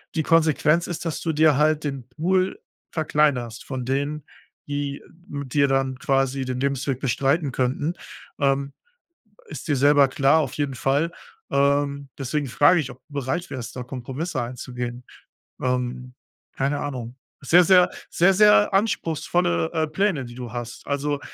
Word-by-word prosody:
die 160 - +1
Konsequenz 160 +1 +3
ist, 175 0 -5
dass 165 - -3
du 165 - -1
dir 155 -2 +4
halt 155 0 +2
den 135 -4 -4
Pool 185 +4 0 0.3
verkleinerst 145 -7 0
von 130 -3 -5
denen, 140 +3 -2 0.4
die 145 -1 -4 0.2
mit 140 -5 -6
dir 140 -1 +4
dann 135 -1 0
quasi 135 0 +1
den 130 -1 -3
Lebensweg 140 -1 -1
bestreiten 140 +3 +1
könnten, 130 +6 -1 0.5
ähm, 140 -1 +1 0.7
ist - - -8
dir 145 - +2
selber 145 +1 +5
klar, 140 +3 +3
auf 135 -5 -2
jeden 145 -2 -2
Fall, 140 +6 +1 0.4
ähm, 140 0 +1
deswegen 140 +1 -2
frage 145 +8 +4
ich, 135 -4 -5
ob 125 - -12
du 145 - -15
bereit 140 +7 -2
wärst, 120 -2 -7
da 125 - -4
Kompromisse 130 +4 -4
einzugehen, 125 0 -6 0.6
ähm, 125 0 -2 0.4
keine 140 +2 0
Ahnung. 125 -4 -5 0.3
Sehr, 175 +6 +6
sehr 180 +1 +6 0.2
sehr, 185 +3 +4
sehr 210 +1 +6
anspruchsvolle, 165 - 0
äh, 160 0 0
Pläne, 160 -3 0
die 120 0 -10
du 125 -2 -7
hast. 120 -1 -6
Also, 145 0 -1
140 Hz, 150 wpm, -23 LUFS, 130-155 Hz, 0.7 s, Sehr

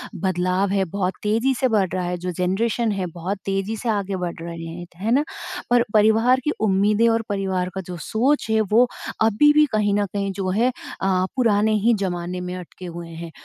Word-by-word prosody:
बदलाव 185 +1 0
है 195 -1 +2
बहुत 185 +1 -2
तेज़ी 230 +6 +2
से 260 - +1
बढ़ 205 -5 +2
रहा 185 -1 -1
है, 180 0 -2
जो 180 +1 -4
जनरेशन 210 +6 0
है 195 -2 -2
बहुत 180 +4 -3
तेज़ी 195 +3 -1
से 230 - -3
आगे 200 -2 -1
बढ़ 180 -2 -3
रहे 170 0 -6
हैं। 170 +2 -7
है 210 +6 -2
ना? 280 +4 +4 0.5
पर 240 -1 +4
परिवार 220 +4 +4
की 300 - +1
उम्मीदें 210 +2 +3
और 225 0 +2
परिवार 190 -2 -1
का 190 - -2
जो 180 - -5
सोच 250 - +1
है 220 0 +3
वो 240 +3 +5 0.3
अभी 225 +7 +5
भी 300 0 +6
कहीं 210 -2 +1
न 205 0 +2
कहीं 200 -1 -1
जो 190 -1 -2
है 230 +7 +2 0.3
अ, 185 -1 +2
पुराने 220 -3 +3
ही 235 - +5
ज़माने 180 -1 -3
में 180 0 -5
अटके 180 0 -9
हुए 170 -1 -7
हैं। 165 0 -8
200 Hz, 205 wpm, -22 LUFS, 180-220 Hz, 0.5 s, भी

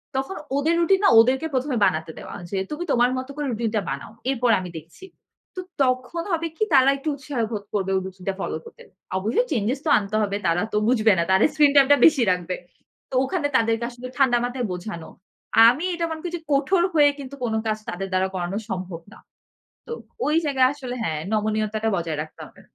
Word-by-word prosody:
তখন 270 +8 -2 0.2
ওদের 315 +4 +2
রুটিন 380 +3 +3
না - - +6
ওদেরকে 260 +7 +3
প্রথমে 260 0 0
বানাতে 160 -3 -1
দেওয়া - - -9 0.2
যে 195 - -2
তুমি 300 +3 -3
তোমার 245 0 +3
মত 255 - -4
করে 295 -1 -3
রুটিন 230 0 -1
টা 210 - +2
বানাও। 140 +8 -5 0.2
এরপর 245 -2 +1
আমি 180 - -6
দেখছি। 165 - -12 0.5
তো 370 - -5 0.2
তখন 255 +6 -1
হবে 330 0 0
কি - - +1
তারা 265 0 +6
একটু 290 +3 -3
উৎসাহ 275 -2 -6
বোধ 210 -2 -4
করবে 195 -2 -1
ওই 190 - +1
রুটিন 190 -1 -10
টা - - 0
ফলো - - -3
করতে। - - -14 0.3
অবশ্যই 225 - +1
চেঞ্জেজ 240 +2 0
তো - - +1
আনতে 205 +1 -5
হবে। 200 0 -1
তারা 170 +1 +2
তো - - +2
বুঝবে 225 -4 +4
না। 170 - +3
তাদের 190 - +5
স্ক্রিন 295 -2 +4
টাইম 275 -1 +7
টা 285 - +7
বেশি 285 -6 +5
রাখবে। 180 0 -2 0.5
তো 260 - -5
ওখানে 310 +1 -1
তাদেরকে 225 0 0
আসলে 245 +1 -9
ঠান্ডা 260 -3 +4
মাথায় 245 -1 -3
বোঝানো। 180 -2 -6 0.6
আমি 290 +9 -1
এটা 335 - -1
মনে 315 -1 -5
করি 350 - -5
যে - - -13
কঠোর 320 +6 +2
হয়ে 295 -2 +6
কিন্তু 275 0 -8
কোন 230 - -1
কাজ 215 0 0
তাদের 195 +2 -4
দ্বারা 185 0 +2
করানো 180 +2 -3
সম্ভব 185 -3 -5
না। - - -14 0.7
তো - - -7 0.3
ওই 300 - +1
জায়গায় 265 -3 +3
আসলে 255 -4 -6
হ্যাঁ 155 -7 -2
নমনীয়তাটা 215 0 0
বজায় 165 -3 -3
রাখতে 155 - -12
হবে। - - -20
240 Hz, 210 wpm, -23 LUFS, 195-285 Hz, 0.7 s, টাইম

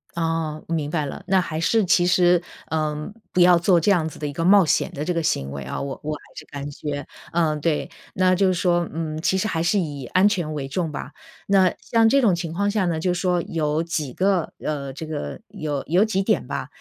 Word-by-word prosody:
哦， 165 -2 -2
明 160 -3 -1
白 155 -3 0
了。 140 - -7
那 190 -1 +4
还 165 -3 -3
是 195 +6 +2
其 175 0 +4
实， 180 -1 +4 0.3
呃， 155 +3 -2 0.2
不 - - 0
要 175 0 +7
做 175 0 +4
这 200 - +2
样 160 -5 +2
子 - - -13
的 150 - -3
一 145 - -5
个 165 - -2
冒 195 +1 +6
险 - - +1
的 150 +2 -5
这 180 - 0
个 165 -1 -1
行 70 - -1
为 70 0 -5
啊。 65 - -4
我 140 -1 -5
我 155 +1 -2
还 150 - -11
是 - - -8
感 140 0 -6
觉， 145 0 -5 0.2
嗯， 155 -3 +1
对， 160 -2 0 0.3
那 185 0 +3
就 195 +1 +3
是 185 - +3
说， 175 -1 +1
嗯， 155 -1 -3
其 190 - +1
实 215 - 0
还 165 -5 -1
是 195 +4 +2
以 145 -6 -4
安 185 +2 +4
全 175 -7 -1
为 140 -3 -4
重 165 +3 -2
吧。 145 - -7 0.3
那 190 -2 +4
像 225 -1 +3
这 275 +3 +4
种 200 -7 +4
情 170 -2 -4
况 200 +4 0
下 205 -2 +1
呢， 165 -2 0
就 180 +2 0
说 180 0 +1
有 155 -1 -1
几 155 -5 -3
个， 185 +2 +1
呃， 140 -3 -3
这 145 +4 -7
个 155 -2 -5
有 155 -9 -4
有 180 +6 +4
几 215 -3 0
点 215 +2 +1
吧， - - -4
165 Hz, 255 characters per minute, -23 LUFS, 150-185 Hz, 0.3 s, 要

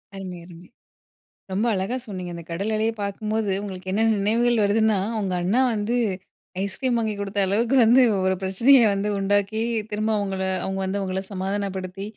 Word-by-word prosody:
அருமை! 185 -2 -7
அருமை! 175 0 -14 0.9
ரொம்ப 205 +5 0
அழகா 195 +6 -2
சொன்னீங்க. 185 -4 -6
அந்த 170 - -7
கடல் 195 +6 -2
அலைய 220 +1 +1
பாக்கும்போது, 215 +1 -2
உங்களுக்கு 185 -2 -6
என்ன 210 +3 +1
நினைவுகள் 230 +3 +2
வருதுன்னா, 215 0 +2 0.2
உங்க 190 -3 -2
அண்ணா 200 +8 +2
வந்து 215 +3 -1 0.7
ஐஸ்கிரீம் 240 +5 -1
வாங்கி 220 -2 -1
குடுத்த 200 0 -2
அளவுக்கு 225 +7 +1
வந்து 240 +4 +6 0.2
ஒரு 190 0 +2
பிரச்சனைய 235 +8 +5
வந்து 200 +1 -1
உண்டாக்கி, 205 +2 +1 0.3
திரும்ப 215 +1 -1
அவுங்கள 195 -2 -2 0.2
அவுங்க 190 0 -3
வந்து 200 +1 -2
உங்கள 190 0 -2
சமாதானப்படுத்தி, 195 0 -3
200 Hz, 155 wpm, -24 LUFS, 190-220 Hz, 0.9 s, வந்து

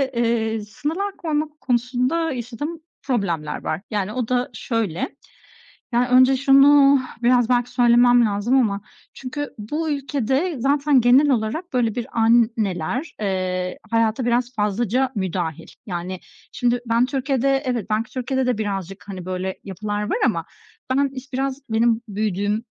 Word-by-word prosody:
eee, 225 -2 0
sınırlar 315 - -4
koymak 305 -2 -3
konusunda 250 +6 0
yaşadığım 265 +7 -5 0.2
problemler 175 - -2
var. 160 +4 -2
Yani, 210 0 -2
o 250 -3 -2
da 250 0 0
şöyle, 220 -5 -2 0.8
ya 245 +1 +2
önce 255 +1 +6
şunu 275 +1 +6 0.2
biraz, 245 -1 +4
belki, 245 0 +1
söylemem 245 0 +5
lazım 210 +4 0
ama, 205 -5 0 0.3
çünkü 290 +2 -6
bu 300 +10 -3
ülkede 280 +3 -1
zaten 280 +1 +3
genel 255 +5 +5
olarak 260 +8 -1
böyle 235 -4 +1
bir 240 -2 -3
anneler, 225 - +1
eee, 185 -2 -2
hayata 230 +2 +1
biraz 240 +1 0
fazlaca 235 +5 0
müdahil. 180 -5 -3 0.2
Yani, 180 -1 -4 0.3
şimdi, 245 0 0
ben 230 +1 +2
Türkiye'de 270 0 0
evet, 245 -5 -2
belki 215 +1 -1
Türkiye'de 260 0 -1
de 250 -3 +1
birazcık, 195 -3 -4
hani, 190 -3 -7
böyle 185 0 -4
yapılar 205 +2 -4
var - - +1
ama - - 0 0.4
ben 275 +2 +2
iş 265 +1 -10
birazcık 270 0 -3
benim 225 +1 +2
büyüdüğüm 205 +1 -1
240 Hz, 135 wpm, -22 LUFS, 210-265 Hz, 0.8 s, önce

